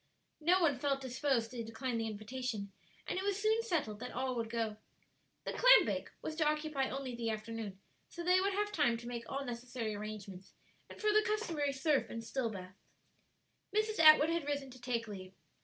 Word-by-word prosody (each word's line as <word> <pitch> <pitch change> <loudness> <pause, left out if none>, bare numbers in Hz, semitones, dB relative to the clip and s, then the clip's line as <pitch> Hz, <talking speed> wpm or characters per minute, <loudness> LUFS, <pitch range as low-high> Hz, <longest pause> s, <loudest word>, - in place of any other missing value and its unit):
No 350 +4 +4
one 290 -6 +3
felt 275 0 +1
disposed 260 -2 0
to 240 -2 -4
decline 230 +2 -3
the 225 - -1
invitation, 215 -1 -4 0.3
and - - -2
it - - -3
was 400 0 0
soon 440 +2 +3
settled 310 - -1
that 250 +1 -5
all 255 0 -2
would 230 -1 -2
go. 225 -2 -2 0.7
The - - -3
clam - - +8
bake - - -2
was 310 - -3
to 320 - +3
occupy 300 -3 0
only 270 -2 -4
the 235 -1 -2
afternoon; 215 -2 -5 0.3
so 345 - -7
they 365 +1 +5
would 395 +1 +1
have 415 +1 0
time 265 - +2
to 235 +1 -9
make 235 -1 -5
all 275 0 -3
necessary 240 -2 -4
arrangements, 205 -2 -7 0.3
and - - -11
for 425 -1 +2
the 430 - +6
customary 350 -10 0
surf 275 +1 +1
and 230 -1 -5
still 240 0 -1
baths. 185 -2 -9 1.0
Mrs. 430 -1 +1
Atwood 310 0 +8
had 335 -3 -1
risen 280 -2 -2
to 255 -1 -13
take 235 -2 -1
leave. 190 -2 -8
260 Hz, 195 wpm, -34 LUFS, 225-315 Hz, 1.0 s, clam